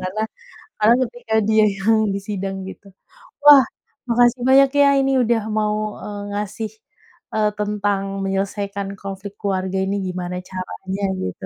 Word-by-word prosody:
Karena 190 +4 -3 0.6
karena 220 +3 +6
ketika 240 -2 -6
dia 220 0 +5
yang 215 0 +2
disidang 195 -1 -4
gitu. 195 0 -12 0.5
Wah, 290 -2 +9 0.4
makasih 240 +1 +3
banyak 270 +1 +6
ya 285 - +7
Ini 270 0 +1
udah 230 0 +1
mau, 210 0 0 0.2
eee, 205 -1 -6
ngasih, 210 +1 -4 0.6
eee, 210 -1 +3
tentang 205 -1 0 0.2
menyelesaikan 195 +1 -2
konflik 195 +1 -7
keluarga 190 -2 -2
ini 200 +1 -1
gimana 180 0 -4
caranya, 190 +1 -5 0.2
gitu. 95 +1 -5
205 Hz, 130 wpm, -21 LUFS, 195-220 Hz, 0.6 s, Wah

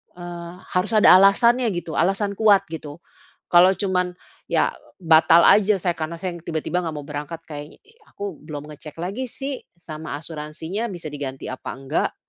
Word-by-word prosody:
eee, 175 -1 -8 0.2
harus 180 +5 0
ada 215 - +7
alasannya 235 +5 +4
gitu, 175 -2 -5
alasan 195 +4 +1
kuat 200 -1 +4
gitu. 155 0 -8 0.5
Kalo 180 +2 +6
cuman 180 -2 -1 0.3
ya - - +2 0.3
batal 165 +1 +6
aja 210 0 +5
saya 175 - +2
karena 155 +2 -3
saya 180 +2 -4
ng 165 - -23
tiba-tiba 165 +2 -1
nggak 165 -3 -4
mau 145 - -6
berangkat 150 +3 -6
kayaknya 150 -1 -9 0.3
aku 200 -5 -7
belum 150 -1 -8
ngecek 150 0 -11
lagi 220 +8 -3
sih 270 +2 -5 0.2
sama 155 -3 -7
asuransinya 160 +7 -5
bisa 170 -6 -7
diganti 135 -3 -6
apa 130 - -7
enggak. 135 0 -2
170 Hz, 160 wpm, -22 LUFS, 155-195 Hz, 0.5 s, ada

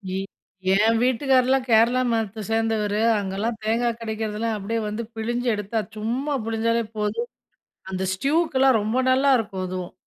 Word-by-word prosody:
இ - - -1 0.6
என் 220 +3 +4
வீட்டுக்காரர்லாம் 260 0 +2
கேரளா 235 +3 +4
மதத்த 220 -2 -2
சேர்ந்தவரு. 220 -2 0 0.2
அங்கலாம் 205 +4 -2
தேங்கா 230 +2 +1
கெடைக்றதெல்லாம் 220 0 -3
அப்டியே 225 +3 -2
வந்து 210 +2 -3
பிழிஞ்சி 240 +2 -2
எடுத்தா, 210 +2 -2 0.2
சும்மா 250 +7 -2
புழிஞ்சாலே 230 +1 0
போதும். 335 - -2 0.6
அந்த 190 0 -2
ஸ்ட்யுக்கெலாம் 270 - +2
ரொம்ப 220 +5 -1
நல்லாருக்கும் 250 -8 +2
அதுவும். 185 -1 -5
225 Hz, 125 wpm, -23 LUFS, 210-250 Hz, 0.6 s, என்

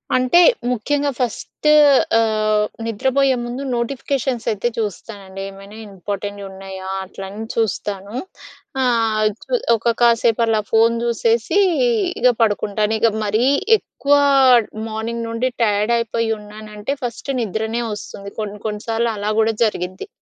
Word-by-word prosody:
అంటే 255 +7 +4 0.3
ముఖ్యంగా 285 +5 0
ఫస్ట్ 250 +4 -3 0.5
ఆహ్, 215 -1 +2 0.2
నిద్రపోయే 265 +4 +1
ముందు 245 +3 -5
నోటిఫికేషన్స్‌సైతే 240 -3 -1
చూస్తానండి. 200 -2 -5
ఏమైనా 195 +2 -12
ఇంపార్టెంట్ 200 +1 -5
ఉన్నాయా? 190 0 -9 0.2
అట్ల 190 - -11
అని 210 +3 -7
చూస్తాను. 205 -2 -2 0.7
ఆహ్, 225 -3 +2 0.2
చు - - -15 0.2
ఒక 230 +1 0
కాసేపు 235 -1 +3
అలా 220 -1 +1
ఫోన్ 225 +1 +4
జూసేసి 235 - +1 0.6
ఇగ 250 - +6
పడుకుంటాను. 210 0 +1
ఇగ 230 - +4 0.2
మరీ 215 +4 +1 0.3
ఎక్కువ 285 -7 -1 0.7
మార్నింగ్ 225 +1 -4
నుండి 230 +3 -1
టైయాడైపోయి 230 +2 +1
ఉన్నానంటే 210 +3 -6
ఫస్ట్ 245 +3 -4
నిద్రనే 220 +2 -2
వస్తుంది. 200 -1 -8
కొన్ని 210 -1 -5
కొన్ని 210 -1 -5
సార్లు 230 +1 0
అలా 205 +1 -1
కూడా 225 0 +2
జరిగిద్ది. 185 -3 -4
220 Hz, 115 wpm, -20 LUFS, 205-235 Hz, 0.7 s, ఇగ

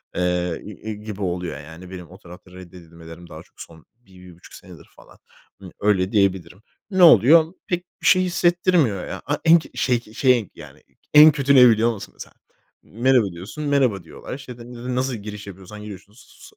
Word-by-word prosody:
eee, 90 -1 -2
g 105 - -9
g 110 +3 -8
gibi 105 -1 -9
oluyor 90 -5 -4
yani 80 +5 -12
benim 90 -3 -10
o 95 - -14
tarafta 90 -1 -15
reddedilmelerim 85 -2 -14
daha 80 +1 -11
çok - - -18
son 80 -2 -14
1-1,5 90 -6 -18
senedir - - -14
falan. - - -19 0.4
Imm, 95 -2 -11
öyle 100 -2 +1
diyebilirim. 95 -2 -1 0.3
Ne 185 -1 +3
oluyor? 160 - +6
Pek 175 0 -3 0.2
bir - - -9
şey 185 - +5
hissettirmiyor 175 - +1
ya. - - -7
A 145 +1 -1
eng 165 0 +6
şey 125 -2 0
şeyin 120 -1 0
yani - - -14 0.3
en 150 +1 +9
kötü 140 -1 +1
ne 125 -2 +8
biliyor 115 +1 +2
musun 105 - -11
mesela? - - -12 0.5
"Merhaba" 120 -3 +1
diyorsun, 95 - -9
"merhaba" 130 -10 0
diyorlar. 80 - -10
İşte, 130 -3 -11
n 120 +1 -12 0.2
n - - -3
nasıl 130 0 -2
giriş 105 -1 -9
yapıyorsan 100 +2 -11
giriyorsunuz. 105 +2 -14
105 Hz, 175 wpm, -21 LUFS, 90-130 Hz, 0.5 s, en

